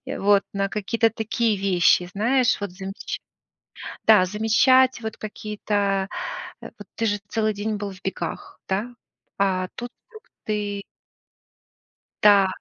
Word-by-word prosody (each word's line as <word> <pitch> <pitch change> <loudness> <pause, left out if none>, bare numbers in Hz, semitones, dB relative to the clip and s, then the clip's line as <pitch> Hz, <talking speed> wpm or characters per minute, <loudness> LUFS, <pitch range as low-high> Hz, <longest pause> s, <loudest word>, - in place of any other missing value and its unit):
и - - -4
вот 200 0 +4
на 195 0 0
какие-то 225 +3 +1
такие 225 0 0
вещи. 180 -2 +3
Знаешь, 245 +4 +2
вот 200 -2 -3
замеч 195 +2 -6 0.9
Да, 210 -4 +7
замечать 240 +6 +4
вот 220 -1 -5
какие-то, 205 -2 -2 0.5
э, - - -9
вот - - -10
ты 225 - -1
же 205 -1 +1
целый 215 0 0
день 210 +1 -2
был 205 -1 -4
в 190 -1 -12
бегах, 175 -3 -5
да? 210 +6 -2 0.4
А 185 -2 +1
тут 240 0 -6 0.2
вдруг 435 -1 -13 0.2
ты 205 -1 -2 1.4
Да. 200 -2 +7
205 Hz, 135 wpm, -24 LUFS, 195-225 Hz, 1.4 s, Да